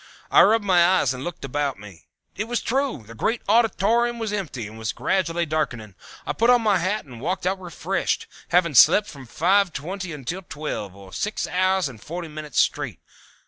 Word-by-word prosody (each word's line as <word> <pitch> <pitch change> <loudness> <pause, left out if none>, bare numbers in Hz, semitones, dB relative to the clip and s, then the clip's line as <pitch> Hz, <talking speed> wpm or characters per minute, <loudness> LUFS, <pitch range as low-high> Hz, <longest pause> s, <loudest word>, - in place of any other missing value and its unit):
I - - +8
rubbed 215 +1 +4
my 180 -3 +5
eyes 175 -7 +3
and 130 +1 -7
looked 175 -3 -6
about 140 -1 -2
me. 100 -5 -13 0.3
It 210 - -2
was 240 +1 -1
true, 265 - -1
the 115 - -11
great 225 - -1
auditorium 230 +2 +2
was 220 -2 -3
empty, 155 - -4
and 110 +2 -10
was 110 -1 -3
gradually 175 -3 0
darkening. 125 -10 -3 0.3
I - - -2
put 230 +2 +2
on 245 -2 +5
my 205 -4 +3
hat 190 +3 -1
and 120 -4 -11
walked 185 +5 -2
out 190 +1 -1
refreshed, 180 +1 -2 0.2
having 170 -2 +2
slept 205 - +7
from 135 -4 -11
five 190 - +2
twenty 180 +5 -5
until 150 +5 -5
twelve, 145 - -6
or 95 -1 -14
six 210 +1 -2
hours 185 -1 +1
and 115 -6 -11
forty 170 0 -6
minutes, 150 -2 -4
straight. - - 0
175 Hz, 190 wpm, -23 LUFS, 135-200 Hz, 0.3 s, I